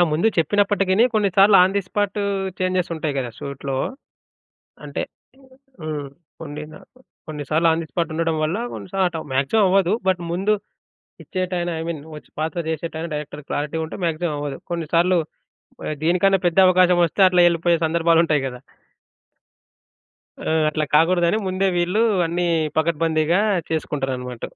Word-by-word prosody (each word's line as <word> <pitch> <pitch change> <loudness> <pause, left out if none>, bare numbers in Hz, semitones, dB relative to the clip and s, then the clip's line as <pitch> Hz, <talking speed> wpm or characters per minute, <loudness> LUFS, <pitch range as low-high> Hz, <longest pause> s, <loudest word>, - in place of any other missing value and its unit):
ఆ! - - +6
ముందు 170 +8 +1
చెప్పినప్పటికిని 200 +4 +2
కొన్నిసార్లు 200 -1 +5
ఆన్ 190 +2 +2
ది - - +3
స్పాట్ 205 +1 -1 0.4
చేంజెస్ 185 -1 0
ఉంటాయి 155 -3 -3
గదా! 125 -3 -3
షూట్‌లో. 140 -1 -5 1.1
అంటే - - -4 0.8
హ్మ్. 150 -3 -4 0.3
కొన్ని 150 -1 -7
నాకు 255 +10 -17 0.3
కొన్నిసార్లు 155 +2 -1
ఆన్ 160 +1 +1
ది - - -8
స్పాట్ 170 -2 -2
ఉండడం 165 -1 0
వల్ల 170 +8 -1
కొన్నిసార్లు 190 0 -2
అట్టవ్ 165 -2 -6
మాక్సిమం 140 +11 +2
అవ్వదు. 190 -1 +3 0.2
బట్ 185 -2 +2
ముందు 195 +4 +1 0.7
ఇచ్చేటైనా 180 -2 -2
ఐ - - -3
మీన్ 155 -4 -4 0.4
పాత్ర 160 +3 -2
చేసేటైనా 160 +1 -4
డైరెక్టర్‌కి 150 -1 -6
క్లారిటీ 150 +2 -2
ఉంటే 160 - -8
మాక్సిమం 165 -1 -1
అవ్వదు. 145 -2 -4
కొన్నిసార్లు 170 +2 +1 0.9
దీనికన్నా 190 +3 +3
పెద్ద 175 +1 0
అవకాశమస్తే 180 -1 +3
అట్లా 180 -1 +3
ఎళ్ళిపోయే 170 0 +1
సందర్భాలుంటాయి 165 -2 +2
గదా! 125 -1 -6 1.8
ఆ! - - -3 0.2
అట్లా 155 0 -1
కాకూడదని 170 +4 +3
ముందే 185 +1 0
వీళ్ళు 180 +5 +1 0.2
అన్ని 175 +2 -1 0.3
పకడ్బందీగా 165 +2 +1 0.3
చేసుకుంటారన్నమాట. 135 -6 -3
170 Hz, 130 wpm, -21 LUFS, 155-185 Hz, 1.8 s, ఆ